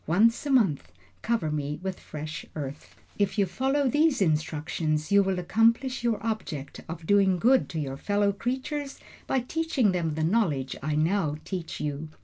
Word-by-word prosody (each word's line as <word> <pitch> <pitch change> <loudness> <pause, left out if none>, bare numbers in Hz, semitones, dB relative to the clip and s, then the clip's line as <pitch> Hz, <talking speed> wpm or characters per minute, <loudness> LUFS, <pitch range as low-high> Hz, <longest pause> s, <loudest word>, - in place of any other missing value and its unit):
Once 225 - +3
a - - -2
month 180 - +2 0.3
cover 225 -10 0
me 150 0 -3
with 190 -1 -3
fresh 155 +2 -6
earth. 145 -1 -7 0.2
If 200 +1 +1
you 200 - +4
follow 265 +9 0
these 295 +2 +3
my 190 -5 +4
instructions 155 0 -1
you 200 0 +7
will 190 -1 0
accomplish 230 +7 +2
your 235 -2 +2
object 165 -11 -4
of 165 0 -6
doing 195 -1 +4
good 255 +8 +3
to 165 - -3
your 135 -2 -3
fellow 205 +4 +1
creatures 265 +6 -3 0.3
by 265 - +1
teaching 275 - +1
them 165 -4 -1
the 160 - -1
knowledge 160 - +1
I 150 +2 -1
now 160 0 +1
teach 180 -4 -5
you." 150 +1 -3
190 Hz, 170 wpm, -27 LUFS, 155-230 Hz, 0.3 s, you